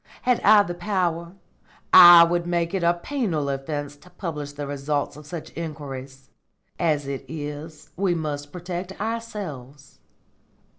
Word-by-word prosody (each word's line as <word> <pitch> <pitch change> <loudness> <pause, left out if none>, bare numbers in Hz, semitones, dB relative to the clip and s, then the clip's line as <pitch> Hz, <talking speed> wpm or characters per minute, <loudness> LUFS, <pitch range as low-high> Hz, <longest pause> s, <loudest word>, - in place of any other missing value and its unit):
Had 250 -1 +2
I 210 0 +6
the 175 - -5
power, 175 -2 -2 0.6
I 175 -2 +11
would 170 +1 0
make 170 0 -1
it 190 - -1
a 170 0 +3
penal 175 - -2
offence 145 +1 -4
to 180 - -19
publish 160 -6 -6
the 145 0 -6
results 145 0 -2
of 150 0 -13
such 170 -1 -7
inquiries. 135 -4 -7 0.5
As 155 -4 +1
it 135 -1 -5
is, 150 0 -8
we 185 -1 +1
must 145 -3 -4
protect 180 +1 -6
ourselves. 190 - -6
165 Hz, 140 wpm, -24 LUFS, 145-180 Hz, 0.6 s, I